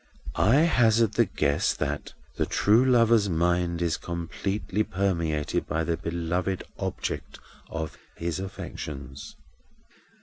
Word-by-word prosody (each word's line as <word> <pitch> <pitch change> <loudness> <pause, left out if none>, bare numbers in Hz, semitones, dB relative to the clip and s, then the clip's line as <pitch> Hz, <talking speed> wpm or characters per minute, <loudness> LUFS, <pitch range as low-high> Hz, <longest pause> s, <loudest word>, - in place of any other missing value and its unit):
I 130 +8 +4
hazard 115 - +4
the 105 - +3
guess 70 0 +1
that - - -3 0.2
the - - 0
true 110 +5 +4
lover's 115 -5 +4
mind 85 0 +1
is 85 -1 +1
completely 95 +4 -3
permeated 85 -7 -1
by 80 +2 0
the 85 0 0
beloved 85 +3 -2 0.2
object - - -4 0.3
of 80 -2 -5 0.2
his 85 +1 -3
affections. 70 -7 -7
90 Hz, 110 wpm, -27 LUFS, 80-105 Hz, 0.3 s, I